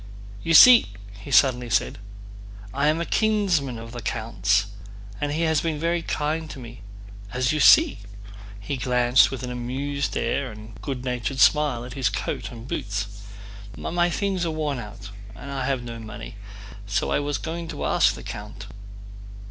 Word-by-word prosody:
"You 165 - +1
see," 240 - +9 0.3
he 100 - -10
suddenly 125 -2 +3
said, 95 0 0 0.7
"I 140 +2 +1
am 155 +2 +2
a 170 - -2
kinsman 190 - +1
of 115 0 -9
the 120 0 -7
count's 105 -3 0 0.6
and 145 - -1
he 155 +3 -1
has 160 -2 +2
been 160 -2 -2
very 170 +2 0
kind 155 0 -2
to - - -8
me. 120 -2 -10 0.5
As 125 +2 +1
you 155 - 0
see" 315 - +6 0.6
(he 135 +7 -4
glanced 125 0 +4
with 130 -2 -6
an 125 - -4
amused 135 +4 -3
air 135 -3 -1
and 110 +1 -11
good 130 -3 -5
natured 125 +2 -3
smile 145 -6 +3
at 125 - -8
his 130 -5 0
coat 95 -2 -4
and 115 0 -10
boots) 100 -2 -4 0.6
"my 175 0 0
things 190 +1 -1
are 170 - 0
worn 150 -4 -2
out 105 -2 -9 0.2
and 140 +6 -9
I 135 -2 -3
have 135 -3 -1
no 115 -1 -7
money, 110 +1 -9 0.5
so 100 -2 -1
I - - +2
was 145 0 -2
going 165 +1 -5
to 160 -3 -5
ask - - +3
the - - -10
count..." - - -8
135 Hz, 170 wpm, -24 LUFS, 120-155 Hz, 0.7 s, see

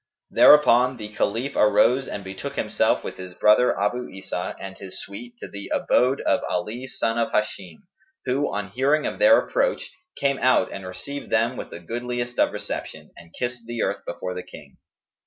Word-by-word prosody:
Thereupon 125 -3 +6
the 105 -2 -7
Caliph 120 +7 -1
arose 125 +5 +4
and 100 - -5
betook 95 0 -6
himself - - +1
with - - -6
his 90 -1 -9
brother 105 +4 +4
Abu 120 +5 -1
Isa 95 -1 -5
and 95 -1 -7
his 95 -1 -8
suite, 120 +5 -9
to - - -8
the 100 0 -9
abode 130 +3 +2
of 115 - +2
Ali 110 +5 -3
son 115 -2 -1
of 115 - 0
Hisham 95 -6 -3 0.4
who, 135 +3 0
on 100 -2 -4
hearing 140 +6 +2
of - - -3
their 275 +1 +7
approach, - - 0 0.3
came 140 -1 +1
out 130 - +3
and 95 -1 -7
received 140 +10 -7
them 115 +3 +2
with - - -7
the - - -8
goodliest 120 +5 -4
of - - +4
reception, - - -6
and 85 -1 -15
kissed 120 -2 -4
the 120 -1 -2
earth - - -2
before 90 - -4
the 90 - -5
King. - - -14
115 Hz, 180 wpm, -24 LUFS, 100-125 Hz, 0.4 s, their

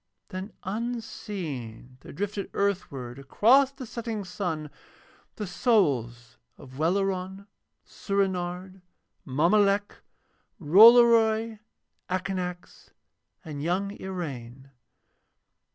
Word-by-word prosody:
Then 190 +2 -6
unseen 190 - -5
there - - -11
drifted 200 +3 -4
earthward 140 -11 -2
across 240 - +4
the 270 -2 -9
setting 225 -2 -5
sun 175 -5 -4 0.6
the 210 - -4
souls 130 - 0 0.2
of 130 0 -13
Welleran, 190 +3 -1 0.4
Soorenard, 185 -1 -3 0.5
Mommolek, 200 +8 +2 0.6
Rollory, 225 +4 +6 0.5
Akanax, 180 -1 -4 0.6
and 150 -3 -6
young 185 +5 -1
Iraine. 135 -8 -7
185 Hz, 75 wpm, -27 LUFS, 150-210 Hz, 0.6 s, Rollory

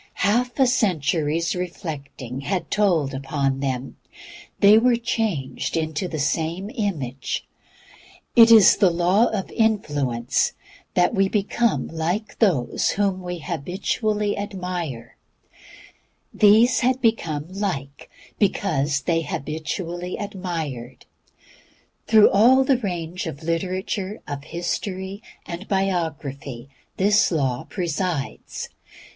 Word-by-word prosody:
Half 245 +4 +1
a 265 - +6
century's 165 - +1
reflecting 150 - -6
had 180 +5 -3
told 170 -10 +2
upon 135 0 -1
them; 135 -1 -3 0.6
they 205 +2 +7
were 245 +1 +4
changed 215 - -2
into 160 +2 -2
the 160 - -5
same 165 +7 -1
image. 155 - -3 0.9
It 230 -2 +9
is 220 -4 +8
the 195 -3 +5
Law 180 +7 +3
of 200 -4 -3
Influence 145 - 0 0.4
that 175 0 +3
we 195 0 +2
become 215 +2 0
like 175 +7 -3
those 170 - +2
whom 195 -2 +1
we 180 -1 -5
habitually 205 - -1
reflect: 180 - -5 1.2
these 215 +4 +5
had 255 +1 +1
become 165 - 0
like 180 -9 -4 0.3
because 155 -8 +1
they 165 +4 +1
habitually 165 +4 -4
reflected. 165 - -5 1.0
Through 220 -2 +6
all 245 +7 +6
the 265 -2 +2
range 175 -4 -4
of 160 0 -7
literature, 185 +4 -2
of 145 0 -6
history, 190 +3 -4 0.2
and 175 +4 -7
biography 150 - -2 0.3
this 205 +2 +3
law 135 -6 -1
presides. 175 -5 -3
180 Hz, 105 wpm, -23 LUFS, 145-205 Hz, 1.2 s, It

